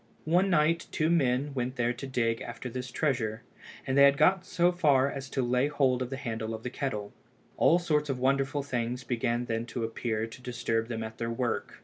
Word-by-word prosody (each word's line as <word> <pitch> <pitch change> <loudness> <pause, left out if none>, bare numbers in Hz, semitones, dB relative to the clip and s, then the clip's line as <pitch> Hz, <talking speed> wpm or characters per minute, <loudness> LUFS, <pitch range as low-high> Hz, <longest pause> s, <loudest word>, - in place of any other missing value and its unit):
One 180 +5 +3
night 165 -1 +2
two 160 +1 +1
men 140 -3 +1
went 125 -1 -2
there 120 -1 +1
to 130 +3 -7
dig 115 -3 0
after 125 - -6
this 125 +1 -5
treasure, 120 -6 -1 0.4
and 130 - -1
they 140 - +6
had 140 0 +5
got 185 +2 +3
so 175 +1 +3
far 140 -6 +3
as 135 -1 -6
to 135 - -1
lay 125 +3 +2
hold 135 -4 +1
of 125 - -2
the 135 - -4
handle 115 -4 -4
of 110 - -10
the 125 - -4
kettle. 105 -7 -4 0.4
All 170 - +5
sorts 150 -4 0
of 135 - -1
wonderful 135 +2 +1
things 125 -2 -2
began 120 0 -1
then 115 0 -2
to 120 0 -4
appear 115 -1 -2
to 115 +2 -11
disturb 115 -2 -1
them 115 -2 -4
at 110 0 -8
their 115 - -2
work. 120 0 -2
125 Hz, 215 wpm, -29 LUFS, 115-140 Hz, 0.4 s, they